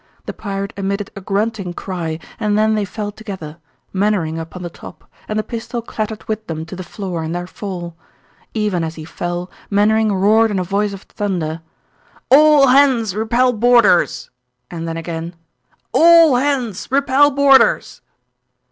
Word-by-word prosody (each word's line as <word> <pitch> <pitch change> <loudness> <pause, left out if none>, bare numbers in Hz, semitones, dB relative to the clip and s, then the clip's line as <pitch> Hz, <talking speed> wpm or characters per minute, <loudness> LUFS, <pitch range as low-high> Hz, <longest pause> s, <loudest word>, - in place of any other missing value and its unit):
The - - -5
pirate 200 -1 -5
emitted 200 +1 -3
a 200 - -8
grunting 200 -1 -2
cry 170 -4 -4 0.2
and 210 -2 +1
then 215 0 +3
they 210 -1 0
fell 205 +1 -5
together, 190 -8 -8 0.4
Mainwaring 190 -5 0
upon 165 +3 -8
the 175 - -4
top, - - -12 0.2
and 215 - -3
the 215 - 0
pistol 235 +1 -5
clattered 215 -1 -5
with 220 0 -4
them 160 -1 -5
to 165 - -9
the 185 - -7
floor 180 -3 -5
in 160 +1 -4
their 175 0 -3
fall. 180 -3 -7 0.6
Even 210 -6 0
as 160 0 -4
he 155 - -8
fell, 175 +2 -5 0.2
Mainwaring 215 +2 +2
roared 215 +4 +3
in 205 - -2
a 185 - 0
voice 200 +3 -1
of 195 - -9
thunder, 170 -6 -3 0.7
"All 295 -1 +7
hands 250 -7 +3
repel 235 +4 +2
boarders!" 235 -5 +3 0.4
And 165 -1 -5
then 165 0 -4
again, 165 +1 -5 0.6
"All 330 -4 +6
hands 250 -6 -1
repel 275 +1 +4
boarders!" 280 -1 +3
205 Hz, 155 wpm, -18 LUFS, 175-225 Hz, 0.7 s, All